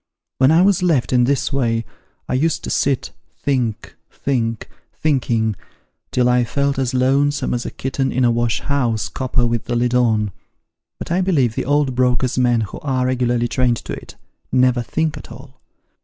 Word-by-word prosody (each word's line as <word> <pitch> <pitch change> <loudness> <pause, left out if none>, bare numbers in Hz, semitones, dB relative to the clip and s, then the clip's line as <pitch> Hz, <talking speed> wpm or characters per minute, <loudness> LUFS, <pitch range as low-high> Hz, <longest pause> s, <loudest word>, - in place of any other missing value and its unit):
When 130 0 +5
I 165 +3 +5
was 195 -2 +3
left 145 -10 +1
in 125 -1 +4
this 140 +1 0
way, 115 -4 0 0.4
I - - -2
used 155 +5 0
to - - -4
sit, 135 -2 0 0.3
think, 125 -6 -2
think, 115 -5 -2 0.3
thinking, 120 -7 0 0.5
till 125 -1 +1
I 125 0 +3
felt 140 +3 -1
as 130 -1 -1
lonesome 140 +3 +1
as 120 0 -2
a - - -2
kitten 135 0 -2
in 130 0 +1
a 120 - +4
wash 120 -1 0
house 120 -7 0
copper 125 -2 -1
with 120 -1 -1
the 120 - -2
lid 120 +1 +1
on; 110 -4 +2 0.7
but - - -7
I 180 +2 +2
believe 145 - +2
the - - -3
old 145 -1 +1
brokers' 125 0 +1
men 120 -2 +3
who 105 - -5
are 130 -4 -1
regularly 120 -2 +1
trained 120 -1 +1
to - - -7
it, - - -9 0.4
never 125 -1 +3
think 155 +6 -2
at - - -11
all. - - -13
125 Hz, 180 wpm, -19 LUFS, 120-140 Hz, 0.7 s, When